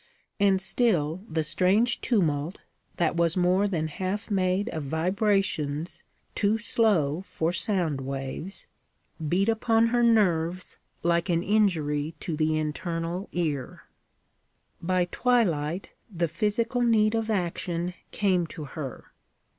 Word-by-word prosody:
And 195 -2 +4
still 185 -6 +1
the 160 -1 0
strange 200 +9 +2
tumult, 165 - 0 0.4
that 170 -1 +1
was 170 +1 +1
more 185 +3 +3
than 165 -5 -1
half 190 +7 -4
made 190 +1 +1
of 160 - -4
vibrations 165 -1 0 0.3
too 210 +2 +2
slow 190 -9 +1
for 165 +2 -1
sound 170 -7 +1
waves, 135 +7 -5 0.6
beat 190 +5 +2
upon 225 0 +3
her 240 +1 +2
nerves 185 -6 +2 0.2
like 170 +1 +1
an 170 0 +1
injury 160 -8 +1
to 165 - -3
the 155 0 +1
internal 165 +4 -3
ear. 150 -7 -3 1.0
By 180 +1 +1
twilight, 180 -7 0 0.2
the 170 -2 0
physical 215 +8 0
need 220 -2 +3
of 225 0 -1
action 175 -2 -2 0.2
came 185 -4 +1
to 155 - -8
her. 135 -2 -7
180 Hz, 120 wpm, -27 LUFS, 160-205 Hz, 1.0 s, And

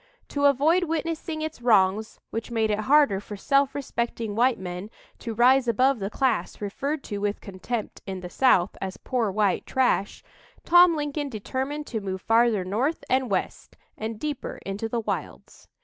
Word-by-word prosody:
To 285 0 0
avoid 305 +6 +4
witnessing 320 0 -3
its 315 -5 -5
wrongs 215 -2 +2
which 225 +2 -4
made 220 -2 0
it 210 - 0
harder 285 -10 +5
for 205 0 -8
self 275 +6 +2
respecting 235 -5 -3
white 245 +2 +3
men 180 +2 -6 0.3
to 230 -2 -5
rise 250 +2 +5
above 255 +3 +3
the 195 0 -3
class 220 -8 -1
referred 275 +9 -3
to 205 -2 -5
with 205 0 -1
contempt 205 +4 -5
in 190 -1 -5
the 180 - -6
South 200 -9 +3
as 190 -1 -4
"poor 245 -5 -1
white 200 -1 0
trash," 250 -6 0 0.4
Tom 350 0 +7
Lincoln 290 -1 -3
determined 265 +6 -4
to 225 -6 -4
move 190 -1 -4
farther 225 -4 +3
north 245 - -1
and 260 -1 +2
west 190 -2 -3 0.2
and 220 0 -5
deeper 300 +1 -4
into 200 +3 -3
the 235 0 -1
wilds. - - -6
235 Hz, 165 wpm, -25 LUFS, 205-280 Hz, 0.4 s, Tom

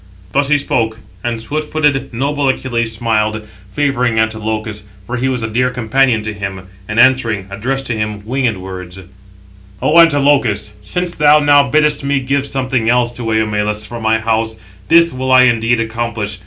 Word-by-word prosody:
Thus 140 0 +1
he 145 +1 +3
spoke; 115 -5 -1 0.3
and 120 -1 -2
swift 150 +6 -4
footed, 150 -3 0
noble 140 +3 -1
Achilles 120 -3 -1
smiled, 110 -1 -1 0.2
favouring 125 -3 0
Antilochus, 110 -1 -2 0.2
for 120 +4 -4
he 130 +2 0
was 125 -3 -2
a - - -1
dear 125 +3 0
companion 125 -1 +1
to 110 0 -4
him; 95 -2 -6 0.2
and, 110 +2 -2
answering, 120 -6 +3
addressed 135 +7 -3
to 120 - -2
him 105 -1 -4
winged 125 -3 -1
words: 95 -1 -8 0.8
"O 160 +3 +4
Antilochus, 140 -10 +3
since 180 - -3
thou 150 0 +5
now 145 -2 +4
biddest 150 0 +2
me 140 0 +1
give 140 +1 -1
something 130 -4 -1
else 120 0 +2
to 120 -2 -4
Eumelus 105 -1 0
from 120 +2 -8
my 110 0 +2
house, 110 0 -1 0.3
this 170 0 +5
will 130 0 -2
I 130 0 +7
indeed 120 -1 +2
accomplish. 110 -3 -3
120 Hz, 170 wpm, -15 LUFS, 110-135 Hz, 0.8 s, I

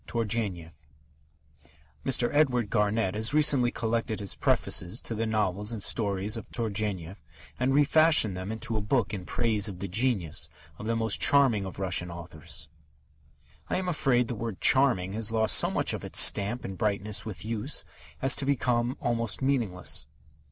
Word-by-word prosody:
XII 120 - -2
TURGENEV 100 -7 -2 1.3
Mr. 125 -2 +1
Edward 125 -7 +1
Garnett 105 -2 +1
has 110 +6 -1
recently 145 -5 +4
collected 115 -2 -2
his 100 -3 -2
prefaces 90 +6 0
to - - -4
the 115 +1 -2
novels 105 -1 -1
and 110 -3 -4
stories 100 0 0
of 115 - -9
Turgenev, 100 -5 -3 0.4
and 130 +1 +1
refashioned 145 - +4
them 95 +3 -5
into 110 0 -4
a 110 - -1
book 105 +1 0
in 95 -3 -5
praise 110 -3 +1
of 95 -3 -7
the 100 - -5
genius 100 - -1 0.3
of 110 - -7
the 115 - 0
most 110 -2 0
charming 130 -8 +3
of 95 - -8
Russian 90 -2 +1
authors. 85 -3 -4 1.0
I - - 0
am 185 0 -3
afraid 135 -8 +1
the - - -3
word 115 -3 -5
"charming" 120 -9 +3
has 110 0 -2
lost 110 -1 +4
so - - +5
much - - 0
of - - -5
its - - +2
stamp 105 +5 +4
and 95 -1 -7
brightness 105 0 -1
with 105 -2 -7
use 115 +5 0 0.4
as 135 - +5
to - - -1
have 135 - -4
become 120 +1 -1
almost 115 -4 0
meaningless. 105 - 0
110 Hz, 170 wpm, -27 LUFS, 100-120 Hz, 1.3 s, so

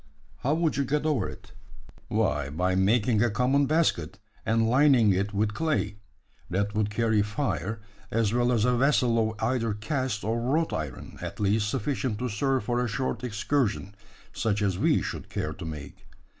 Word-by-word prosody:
How 145 +4 0
would 160 -3 0
you 140 - +2
get 150 +3 -1
over 140 -11 +1
it?" - - -12 0.6
"Why, 65 - 0
by 90 +5 0
making 105 +3 +3
a 120 - +3
common 130 +6 +2
basket, 150 - +1 0.3
and 115 0 +3
lining 125 -4 +5
it 100 +2 -1
with 105 +1 0
clay. 125 -8 -1 0.5
That 100 +3 -1
would 105 -1 0
carry 110 0 +2
fire, 105 - -2 0.3
as 110 -1 +1
well 120 0 +2
as 115 -3 +2
a 125 0 +3
vessel 120 -4 +3
of 105 - -8
either 115 -2 0
cast 130 -1 -2
or 115 +3 -1
wrought 150 +7 0
iron 75 -5 -5
at - - -6
least 105 +1 +1
sufficient 125 0 -1
to 125 +3 -2
serve 130 +4 0
for 120 +3 0
a - - -1
short 125 +3 -2
excursion 110 -3 -1 0.4
such 105 -2 0
as 95 -2 +1
we - - +3
should - - -5
care - - -3
to - - -8
make. 75 -4 -8
115 Hz, 175 wpm, -27 LUFS, 105-130 Hz, 0.6 s, lining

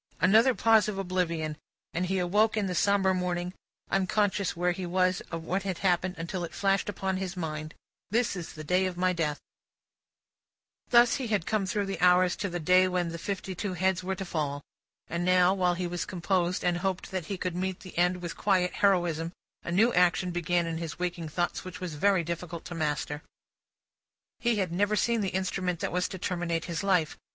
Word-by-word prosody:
Another 225 +6 +5
pause 225 -2 +4
of 210 -2 -3
oblivion, 170 -5 -1 0.4
and 180 +2 -1
he 190 +1 0
awoke 205 +5 +2
in 210 - +1
the 185 - -2
sombre 195 +1 +3
morning, 180 -1 -2 0.4
unconscious 195 -1 +1
where 180 +1 +2
he 185 +2 -4
was 185 +1 +1
or 165 - -2
what 175 +4 -2
had 190 -3 -3
happened, 185 0 +1
until 175 +2 -4
it 170 0 -6
flashed 195 +1 +1
upon 190 -2 -2
his 190 -1 -4
mind, 155 -2 -4 0.3
"this 230 0 +1
is 175 -3 -6
the 155 - -8
day 180 +4 +2
of 180 -1 -5
my 185 0 +2
death!" 155 -4 -1 1.5
Thus, 240 0 +6
had 255 -5 -4
he 210 - +3
come 195 +2 -1
through 205 +2 0
the 195 0 -4
hours, 180 0 +5
to 200 - -2
the 175 0 -3
day 185 +3 +5
when 180 -2 0
the 170 0 -6
fifty 190 +1 -4
two 185 +1 -3
heads 185 +1 +1
were 190 +1 -2
to 195 0 -5
fall. 145 -4 -2 0.4
And 170 +1 -2
now, 180 0 +4
while 180 -2 +1
he 180 +1 -2
was 175 0 -2
composed, 180 0 0
and 175 -1 +2
hoped 185 +1 -2
that 185 -4 -3
he 195 - -3
could 180 -1 -3
meet 185 0 -2
the 185 - -11
end 180 +1 +1
with 170 - -4
quiet 185 -3 +1
heroism, 175 -4 +1 0.3
a - - -4
new 220 +7 +4
action 180 0 +3
began 175 0 0
in 165 -1 -3
his 165 -2 -5
waking 175 -2 -3
thoughts, 175 +3 -2
which 185 -1 -8
was 180 -3 -5
very 190 +3 +2
difficult 170 0 -5
to 175 - -6
master. 150 -2 -2 1.2
He 240 -1 +2
had 190 -5 -1
never 205 +4 +1
seen 230 +1 +1
the 195 - 0
instrument 185 -2 -2
that - - -1
was 180 +1 0
to 190 - -7
terminate 170 -2 -2
his 170 0 -3
life. 180 -6 +1
180 Hz, 205 wpm, -28 LUFS, 170-190 Hz, 1.5 s, Thus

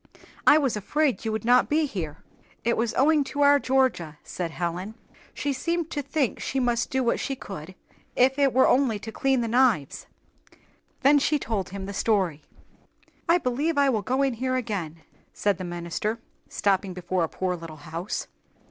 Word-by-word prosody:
"I 300 - +8
was 275 -7 +1
afraid 270 +6 0
you 220 - 0
would 220 0 -3
not 245 +1 +4
be 310 +1 +2
here." 165 - -5 0.5
"It 235 0 +2
was 230 0 -1
owing 300 +2 +4
to 290 +2 -3
our 285 0 +6
Georgia," 255 - +1
said 175 -2 -4
Helen. 175 +5 -4 0.4
"She 285 - -2
seemed 335 +3 -2
to 290 - -2
think 280 -2 -1
she 270 - -2
must 240 -2 0
do 265 0 0
what 235 - +1
she 270 - -2
could, 185 -6 -9 0.4
if 265 +3 +3
it 275 -1 +4
were 260 +2 +4
only 250 -5 +3
to 220 +2 -8
clean 265 +1 +1
the 230 - -1
knives." 230 - +1 0.9
Then 285 +2 +6
she 300 +2 +2
told 215 -9 -3
him 195 0 -6
the 200 - -6
story. 190 -7 0 0.9
"I 340 - +6
believe 290 +2 -1
I 280 -1 +4
will 220 -5 +1
go 260 +6 0
in 270 -2 +1
here 255 +2 -1
again," 185 -10 -4 0.3
said 205 -3 0
the - - -4
minister, 175 +6 -3 0.3
stopping 195 -2 0
before 180 0 -1
a 160 - -1
poor 185 -1 -2
little 165 -2 -9
house. 165 +5 -4
230 Hz, 185 wpm, -26 LUFS, 185-270 Hz, 0.9 s, I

